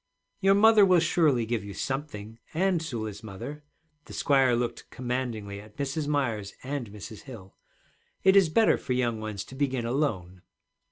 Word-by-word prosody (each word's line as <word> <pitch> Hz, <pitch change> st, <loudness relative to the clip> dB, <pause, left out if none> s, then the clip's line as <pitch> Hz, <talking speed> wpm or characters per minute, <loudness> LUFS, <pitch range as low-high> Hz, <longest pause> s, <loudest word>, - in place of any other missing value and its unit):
'Your 195 Hz, 0 st, +4 dB
mother 220 Hz, 0 st, +7 dB
will 185 Hz, -2 st, +6 dB
surely 155 Hz, -7 st, +2 dB
give 115 Hz, -1 st, -2 dB
you 100 Hz, -1 st, -8 dB
something, 115 Hz, -6 st, -5 dB, 0.2 s
and 185 Hz, 0 st, +2 dB
Sula's 110 Hz, -10 st, -5 dB
mother.' 115 Hz, +8 st, -8 dB, 0.4 s
The -, -, -11 dB
squire 135 Hz, -3 st, +3 dB
looked 120 Hz, 0 st, -3 dB
commandingly 120 Hz, -5 st, -4 dB
at 105 Hz, 0 st, -17 dB
Mrs. 140 Hz, +2 st, -2 dB
Myers 115 Hz, -9 st, -1 dB
and 135 Hz, -4 st, -4 dB
Mrs. 105 Hz, +1 st, -10 dB
Hill. 110 Hz, -8 st, -11 dB, 0.7 s
'It 190 Hz, 0 st, +6 dB
is 195 Hz, -4 st, +6 dB
better 220 Hz, +7 st, +4 dB
for 130 Hz, -, -2 dB
young 120 Hz, -3 st, 0 dB
ones 105 Hz, -2 st, -4 dB
to -, -, -13 dB
begin 130 Hz, -3 st, -1 dB
alone.' 105 Hz, -9 st, -2 dB
125 Hz, 160 wpm, -28 LUFS, 110-150 Hz, 0.7 s, mother